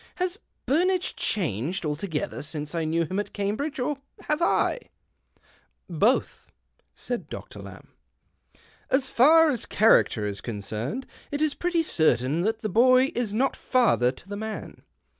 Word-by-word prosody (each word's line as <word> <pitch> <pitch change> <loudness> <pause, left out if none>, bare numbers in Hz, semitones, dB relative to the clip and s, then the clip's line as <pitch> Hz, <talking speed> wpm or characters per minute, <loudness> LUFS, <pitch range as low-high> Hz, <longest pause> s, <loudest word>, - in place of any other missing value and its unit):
Has 365 +2 -2 0.3
Burnage 360 +5 +1
changed 165 - -2
altogether 150 +1 -3
since 150 +1 -5
I 165 -2 -1
knew 165 +1 +1
him 185 +6 -3
at 205 -1 -5
Cambridge, 230 +9 -2
or 275 +3 -1 0.2
have 300 +2 -1
I? 345 - +2 0.4
" - - -34
" - - -38 0.2
Both," 200 - 0 0.5
said 245 -1 -5
Doctor - - -8
Lamb. - - -11 0.5
" - - -31 0.3
As 265 0 +2
far 315 +6 +5
as 245 - -4
character 205 - +3
is 100 -1 -4
concerned, 110 - -4 0.2
it 290 - -3
is 305 -1 +1
pretty 350 -2 0
certain 155 - +2
that 220 +3 -1
the 215 - -2
boy 255 - +4
is 240 -4 -2
not 250 +5 +1
father 235 - +2
to 135 - -15
the 205 - -5
man. 220 +1 -6
215 Hz, 155 wpm, -26 LUFS, -, 0.5 s, far